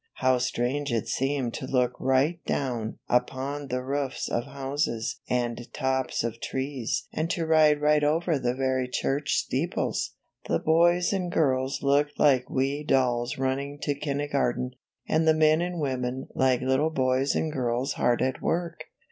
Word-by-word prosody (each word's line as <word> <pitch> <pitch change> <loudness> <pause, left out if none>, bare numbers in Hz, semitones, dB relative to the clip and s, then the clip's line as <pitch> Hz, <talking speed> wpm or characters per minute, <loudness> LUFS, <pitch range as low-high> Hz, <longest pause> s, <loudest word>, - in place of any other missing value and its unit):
How 130 -1 +2
strange 125 +3 -1
it 115 -2 -1
seemed 135 -3 -1
to 130 - -5
look 125 -2 +2
right 135 +6 +1
down 120 -5 -2
upon 135 +3 -1
the 125 0 -2
roofs 135 0 -2
of 120 - -1
houses 135 -3 -3
and 120 0 -2
tops 130 -2 -1
of 115 0 -4
trees 130 -3 -3
and 160 +1 -1
to 170 -1 -1
ride 155 -2 +5
right 150 0 +3
over 160 +1 +1
the 125 -1 -1
very 130 -1 0
church 135 +3 -1
steeples! - - -1 0.3
The - - +2
boys 175 +3 +3
and 180 -3 -1
girls 135 -4 +1
looked 145 +1 +2
like 130 -4 +4
wee 135 +3 -1
dolls 125 -3 +1
running 135 +2 -2
to 145 - +1
kindergarten, 140 -3 -1 0.4
and 160 +1 +2
the 160 - +5
men 155 +1 +4
and 175 -1 -3
women 130 -2 -2
like 130 -2 +2
little 130 +4 +2
boys 130 -2 +1
and 160 - 0
girls 125 0 -1
hard 120 0 +1
at 130 0 -1
work. 170 -1 -2
135 Hz, 155 wpm, -27 LUFS, 125-150 Hz, 0.4 s, ride